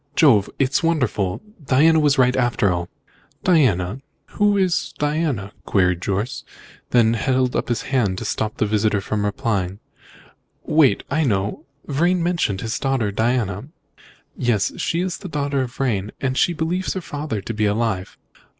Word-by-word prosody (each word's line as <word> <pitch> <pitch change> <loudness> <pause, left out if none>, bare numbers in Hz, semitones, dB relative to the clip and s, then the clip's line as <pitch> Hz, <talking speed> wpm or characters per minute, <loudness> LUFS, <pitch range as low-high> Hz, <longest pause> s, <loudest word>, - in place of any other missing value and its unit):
Jove! 115 -11 +5
it's 135 0 +1
wonderful! 130 - 0 0.2
Diana 155 +5 +4
was 145 -1 +3
right, 125 -1 +4
after 120 -5 +2
all!" 85 0 -4 0.5
"Diana? 125 - +2 0.3
Who 205 -1 +2
is 185 -3 0
Diana?" 145 -9 -1 0.2
queried 90 -3 +2
Jorce, 100 +7 -2 0.5
then 115 -2 +4
held 130 +2 +1
up - - -1
his 120 - -1
hand 110 -9 0
to 115 - -5
stop 110 0 -2
his 105 - +2
visitor 105 -1 +2
from 105 +2 -2
replying. 100 -2 -1 0.9
"Wait! 150 -4 +3
I 155 +3 +2
know! 100 -6 -1 0.2
Vrain 170 +5 +1
mentioned 170 - 0
his 115 0 -3
daughter 135 -6 0
Diana." 110 -1 0 0.7
"Yes, 115 -5 +1
she 170 - 0
is 185 -1 -3
the 190 - -8
daughter 140 -2 -1
of 125 -2 -5
Vrain, 110 -6 -1
and 130 -1 -1
she 175 - +2
believes 170 +4 -2
her 190 - -2
father 145 -8 -4
to 115 - -5
be 105 -1 +1
alive." 105 -3 -1
125 Hz, 155 wpm, -21 LUFS, 105-150 Hz, 0.9 s, Jove